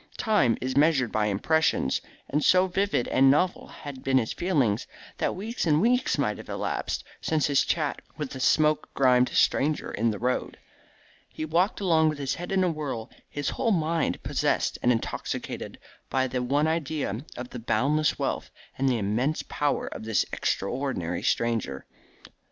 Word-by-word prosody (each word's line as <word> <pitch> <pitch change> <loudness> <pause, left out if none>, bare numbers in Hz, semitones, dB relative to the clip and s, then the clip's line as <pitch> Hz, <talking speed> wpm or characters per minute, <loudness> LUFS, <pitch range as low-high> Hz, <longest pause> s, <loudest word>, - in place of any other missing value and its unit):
Time 140 - +2
is 130 0 -3
measured 140 -5 +3
by 105 -1 +1
impressions, 105 - +1 0.3
and 150 +2 0
so 185 0 +5
vivid 190 -7 0
and 135 0 +5
novel 175 +7 +2
had 140 -3 -9
been 135 0 +3
his 115 -4 0
feelings, 140 - 0 0.3
that - - 0
weeks 215 +1 -3
and 150 -1 +4
weeks 245 +6 +2
might - - 0
have - - -11
elapsed - - -2 0.2
since 155 -2 +1
his 140 -2 +3
chat 150 -4 -1 0.2
with 150 -3 -4
the 130 - -6
smoke 155 +3 +2
grimed 125 -2 +4
stranger 150 +2 +1
in 115 +2 +1
the 105 - -2
road. 125 +3 -2 0.7
He 155 - -5
walked 175 +6 +1
along 160 -5 +3
with 155 - -3
his 140 -1 -2
head 175 +2 -6
in 190 -1 +2
a 180 - +2
whirl, 135 -7 -5 0.2
his 145 -1 -2
whole 235 - -1
mind 165 -4 0
possessed - - 0
and 125 - +4
intoxicated 115 - -3 0.3
by 130 0 +1
the 125 -1 -2
one 140 +4 +1
idea 150 -8 -2
of 125 0 -7
the 125 - -6
boundless 145 +5 +1
wealth - - -2 0.3
and 135 0 +3
the 125 - +1
immense 115 +9 0
power 145 -1 0
of - - -7
this 110 -4 +1
extraordinary 95 -6 -2
stranger. 115 - -1
140 Hz, 170 wpm, -27 LUFS, 125-160 Hz, 0.7 s, so